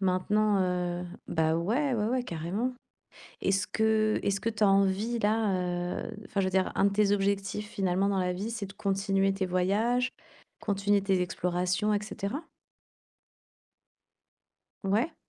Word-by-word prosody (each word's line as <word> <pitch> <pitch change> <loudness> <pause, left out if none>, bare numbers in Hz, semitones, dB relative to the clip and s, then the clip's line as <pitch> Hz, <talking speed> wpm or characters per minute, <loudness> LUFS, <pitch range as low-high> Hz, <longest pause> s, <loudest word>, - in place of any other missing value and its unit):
Maintenant, 200 +2 +2
heu 180 -1 -1 0.2
ben 160 0 +2
ouais, 245 - +1
ouais, 215 -2 0
ouais, 255 +1 0
carrément. 190 +10 -2 0.7
Est-ce 195 +1 +1
que 220 -1 +2
est-ce 200 0 0
que 230 - 0
tu 215 -1 -4
as - - +6
envie 195 +4 +2
là 185 -5 0
heu, - - -6 0.2
enfin 200 - -1
je - - +1
veux - - 0
dire, 190 0 +1
un - - +2
de - - +3
tes 200 0 +2
objectifs 200 +1 0
finalement 195 -2 0
dans 200 -1 +1
la 180 -1 +1
vie, 200 +5 -4
c'est 220 -3 -4
de 195 - -11
continuer 195 0 +1
tes 195 -1 -1
voyages, 215 +8 +1 0.5
continuer 200 0 +1
tes 190 -2 +2
explorations, 180 +3 0
et 205 - 0
cetera? 215 +7 -4 2.4
Ouais. 215 - +1
195 Hz, 155 wpm, -29 LUFS, 185-215 Hz, 2.4 s, as